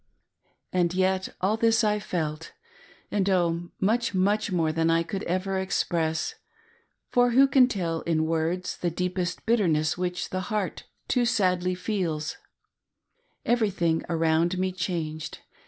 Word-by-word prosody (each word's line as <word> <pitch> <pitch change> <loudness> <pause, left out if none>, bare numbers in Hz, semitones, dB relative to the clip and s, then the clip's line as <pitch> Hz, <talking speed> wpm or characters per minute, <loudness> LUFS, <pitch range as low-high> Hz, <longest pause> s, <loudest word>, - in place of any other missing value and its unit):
And 175 -1 +1
yet, 190 0 +1 0.2
a]l 210 +4 +2
this 225 0 +3
Lfelt, 175 -7 -2 0.6
and, 200 -1 +1
oh, 175 -2 +1
much, 225 +4 +1
fttuch 205 +3 +1
more 165 -3 +1
than 165 +1 +1
I 165 0 +3
could 190 +3 -4
ever 190 +2 -1
express; 165 -4 -1 0.8
for 245 0 +4
who 275 +1 +8
can 265 -2 +5
tell 170 -8 -2
in 160 -1 0
words 165 +3 -1
the 175 - -1
deepest 180 +1 -3
bitterness 165 -8 +2
which 180 0 -2
the 185 - -1
heart 210 -4 -2 0.2
too 250 -2 +2
sadly 185 -5 +1
feels 175 -6 -2 0.5
} 485 +1 -47
Everything 195 -9 +1
around 165 +2 +2
me 185 0 0
changed. 165 -3 -4
180 Hz, 135 wpm, -26 LUFS, 165-205 Hz, 0.8 s, who